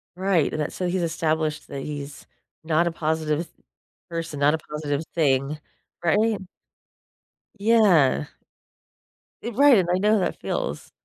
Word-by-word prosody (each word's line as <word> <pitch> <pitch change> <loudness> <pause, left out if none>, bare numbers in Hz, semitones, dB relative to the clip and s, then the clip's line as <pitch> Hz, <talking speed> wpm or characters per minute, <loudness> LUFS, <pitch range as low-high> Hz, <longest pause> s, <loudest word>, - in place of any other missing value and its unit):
Right, 185 -5 +1
and 155 - -2
that 150 - -3
so 180 - -2
he's 180 0 0
established 160 -2 -1
that 140 -1 -6
he's 145 -2 -7 0.4
not 165 +2 +2
a - - 0
positive 155 -1 -1
s 170 - -7 0.6
person, 165 -3 -4
not 145 +2 +4
a - - +1
positive 150 -1 -4
thing. 140 -1 +1 0.4
Right? 210 +4 +2 1.2
Yeah. 190 - +4 1.2
Eh, 235 - -4
right 280 -3 +7
and 175 -2 +1
I - - +3
know 210 +3 +3
how 215 - +4
that 180 - -2
feels. - - -3
160 Hz, 145 wpm, -24 LUFS, 150-185 Hz, 1.2 s, right